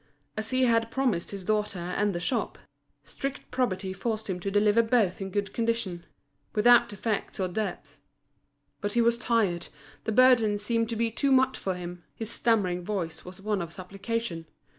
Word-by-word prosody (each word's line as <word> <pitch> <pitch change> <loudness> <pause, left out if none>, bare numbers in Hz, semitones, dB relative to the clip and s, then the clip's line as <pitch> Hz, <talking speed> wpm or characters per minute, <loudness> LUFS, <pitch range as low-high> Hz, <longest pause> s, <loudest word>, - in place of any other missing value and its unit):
As 215 +1 -2
he 255 0 +2
had 230 -2 +3
promised 240 -10 0
his 200 -2 -6
daughter 210 0 0
and 180 +3 -1
the - - -1
shop, 230 +7 -1 0.5
strict 275 0 -6
probity 190 -7 -1
forced 220 +3 -3
him 185 -2 -2
to 195 - -2
deliver 205 +2 +4
both 225 -5 +1
in 195 - -3
good 200 +1 -2
condition, 225 -7 -1 0.5
without 240 +2 +6
defects 205 0 -3
or 185 - +1
debts. 210 +4 -4 0.8
But 205 -1 -2
he 240 - +3
was 235 0 +3
tired, 210 -9 +1 0.4
the - - 0
burden 230 -3 +5
seemed 230 +2 0
to 230 - -2
be 230 0 0
too 275 +5 +1
much 260 0 +4
for 190 -1 -2
him, 175 -1 -7
his 225 0 -5
stammering 185 -6 +1
voice 175 -5 -3
was 180 +1 -10
one 210 -1 -1
of 170 -1 -5
supplication. 195 -1 -4
210 Hz, 175 wpm, -28 LUFS, 185-230 Hz, 0.8 s, without